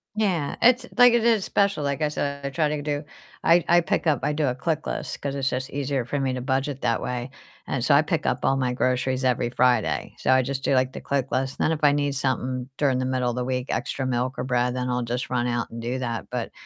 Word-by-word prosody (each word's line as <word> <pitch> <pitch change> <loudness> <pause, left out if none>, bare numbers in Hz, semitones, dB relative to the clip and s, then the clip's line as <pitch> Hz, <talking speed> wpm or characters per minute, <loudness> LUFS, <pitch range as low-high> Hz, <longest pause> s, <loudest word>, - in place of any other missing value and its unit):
Yeah. 185 -9 0
It's 245 +1 +5
like, 245 -1 +8
it 235 -1 +3
is 225 -4 +3
special 200 -6 +1
like, 140 +2 -2
I 150 - +2
said, 140 -1 -3
I 140 - -1
try 150 +3 +1
to 150 0 -2
do 145 0 -2 0.4
I 170 +1 +5
I 175 0 +6
pick 165 +1 -1
up 150 -5 +3
I 150 - +1
do 150 0 0
a 125 - +1
ClickList, 125 - -3
'cause 140 -1 -3
it's 135 -1 0
just 130 +2 -3
easier 140 -2 -2
for 145 +4 -2
me 135 -1 0
to 130 - -3
budget 135 +1 -1
that 115 - 0
way 125 0 -3 0.4
and - - -2
so, - - +4
I - - +6
pick - - -2
up - - +1
all 135 - +2
my 125 -2 0
groceries 130 +1 0
every 125 -2 +1
Friday. 125 0 +1
So, - - +1
I 130 0 +5
just 135 +1 -4
do, - - +2
like, 130 0 +2
the - - -7
ClickList 135 -1 -1
then - - +1
if 160 - -1
I 145 -1 +6
need 145 -1 0
something 130 -1 -2
during 135 -3 +2
the 130 - -1
middle 130 -1 0
of 120 - -3
the 125 - -1
week, 125 0 -2
extra 135 - -2
milk 125 0 -1
or 125 - -2
bread, 125 -1 0
then 125 0 -2
I'll 125 0 0
just 120 +2 -3
run 125 -1 0
out 120 -1 -1
and 115 0 -7
do 120 +3 -2
that, 115 -3 -3
but, - - -4
130 Hz, 260 wpm, -24 LUFS, 125-145 Hz, 0.4 s, like